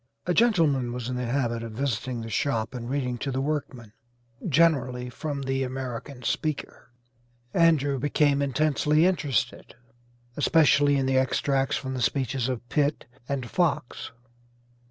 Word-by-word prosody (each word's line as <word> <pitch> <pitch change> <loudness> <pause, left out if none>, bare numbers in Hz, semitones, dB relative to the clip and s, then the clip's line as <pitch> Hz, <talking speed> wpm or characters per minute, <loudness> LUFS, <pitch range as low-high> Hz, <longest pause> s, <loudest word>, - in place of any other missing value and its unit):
A 180 - +1
gentleman 165 - +3
was 125 0 -4
in 125 - -2
the 125 -1 -2
habit 120 -2 -1
of 115 -1 -7
visiting 125 -1 -2
the 115 - -6
shop 115 -4 -1
and 120 -1 -6
reading 125 -3 -2
to 140 - -3
the 130 0 -2
workmen, 135 -6 -3 0.6
generally 130 -6 +2
from 140 +2 -4
the 135 0 -1
'American 130 0 -5
Speaker.' 155 -1 -3 0.6
Andrew 145 -5 +3
became 145 +1 +2
intensely 150 +3 +2
interested, 150 -13 -1 0.6
especially 145 -2 +4
in 135 - 0
the 130 0 +3
extracts 135 +1 +1
from 130 -1 -5
the 130 - -3
speeches 130 -1 0
of 120 -1 -4
Pitt 145 +3 0 0.2
and 135 -3 -2
Fox. 160 -5 -1
135 Hz, 140 wpm, -26 LUFS, 125-145 Hz, 0.6 s, especially